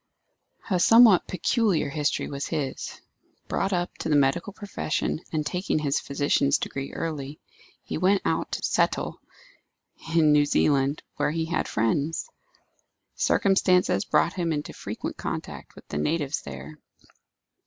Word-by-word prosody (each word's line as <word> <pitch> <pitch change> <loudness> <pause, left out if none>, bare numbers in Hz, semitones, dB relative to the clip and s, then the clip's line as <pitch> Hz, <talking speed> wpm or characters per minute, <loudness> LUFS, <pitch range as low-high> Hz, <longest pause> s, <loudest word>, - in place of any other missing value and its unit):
A 180 - +3
somewhat 225 0 +7
peculiar 205 -1 +1
history 145 +1 -1
was 140 0 -4
his. 150 -5 -4 0.5
Brought 195 - -1
up 175 -1 -1
to - - -3
the 150 - +3
medical 145 +8 +2
profession, 200 -6 -3
and 155 -2 -1
taking 180 +4 -1
his 145 -2 0
physician's 140 0 +1
degree 135 0 -5
early, 150 -3 -5 0.4
he - - -4
went 190 +2 +3
out - - -1
to - - -3
settle - - 0 0.9
in 155 -2 +5
New 145 0 +5
Zealand, 140 0 +1
where - - +1
he 160 +1 -1
had 170 - -1
friends. 140 - -1 0.8
Circumstances 185 - +2
brought 170 - +2
him 170 -3 -1
into 150 -1 -3
frequent - - -6
contact - - -6
with - - -15
the - - -3
natives 145 - -1
there. 155 -1 -9
155 Hz, 135 wpm, -26 LUFS, 140-180 Hz, 0.9 s, somewhat